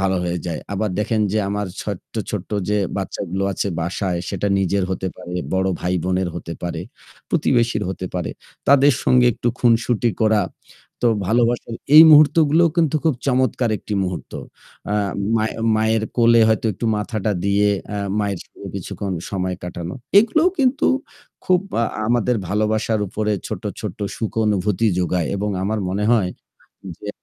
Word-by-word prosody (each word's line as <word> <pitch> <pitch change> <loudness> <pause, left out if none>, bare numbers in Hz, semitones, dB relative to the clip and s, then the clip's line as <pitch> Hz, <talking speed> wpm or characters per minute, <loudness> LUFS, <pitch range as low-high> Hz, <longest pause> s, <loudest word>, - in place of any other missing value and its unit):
ভালো 95 0 +1
হয়ে 90 0 -1
যায়। 85 -2 -3
আবার 105 +1 -1
দেখেন 110 +1 0
যে 110 - +1
আমার 105 0 -2 0.2
ছোট্ট, 100 -4 -7 0.2
ছোট্ট 100 -3 -5 0.2
যে 105 - +2 0.2
বাচ্চাগুলো 95 -1 -3
আছে 100 - -2
বাসায় 90 +1 -2
সেটা 100 0 -2
নিজের 95 0 +1
হতে 95 0 -2
পারে, 90 -1 -8 0.2
বড় 95 0 +1
ভাই 90 +1 -1
বোনের 95 0 0
হতে 85 -1 -6
পারে। 85 -1 -3 0.5
প্রতিবেশীর 120 -2 +1
হতে 95 -1 -5
পারে। 90 -2 -2 0.4
তাদের 140 +1 +6
সঙ্গে 125 -1 +5
একটু 120 - -2
খুনসুটি 120 0 +2
করা। 110 -1 +3 0.6
তো - - +4 0.2
ভালোবাসার 115 +2 +1 0.2
এই 155 - +12
মুহূর্তগুলোও 155 +2 +6
কিন্তু 160 -3 +2
খুব 160 -3 +3
চমৎকার 130 -2 +1
একটি 105 - -5
মুহূর্ত। 90 -2 -5 0.6
আ - - +1 0.4
মায়ের 110 0 -1 0.2
মায়ের 110 0 +1
কোলে 115 -1 +5
হয়তো 110 +1 +1
একটু 100 - -7
মাথাটা 105 0 -2
দিয়ে 100 +1 +3 0.3
আ - - -2 0.2
মায়ের 100 -3 -1
সঙ্গে - - -11
কিছুক্ষণ 100 -2 -4 0.2
সময় 95 -2 -2
কাটানো। 85 0 -6 0.2
এগুলোও 315 - +3
কিন্তু 265 0 +2 0.6
খুব 180 -1 +3 0.2
আ - - +3 0.2
আমাদের 120 +1 +2
ভালোবাসার 110 +2 0
উপরে 105 +2 -1
ছোট্ট, - - -6 0.2
ছোট্ট - - -6 0.2
সুখ 110 - -3
অনুভূতি 105 +1 +1
যোগায়। 90 -2 0
এবং 105 +1 -2
আমার 105 +3 -1
মনে 100 +3 -1
হয় 100 -6 +2 0.7
যে 105 - -8
105 Hz, 155 wpm, -21 LUFS, 95-120 Hz, 0.7 s, এই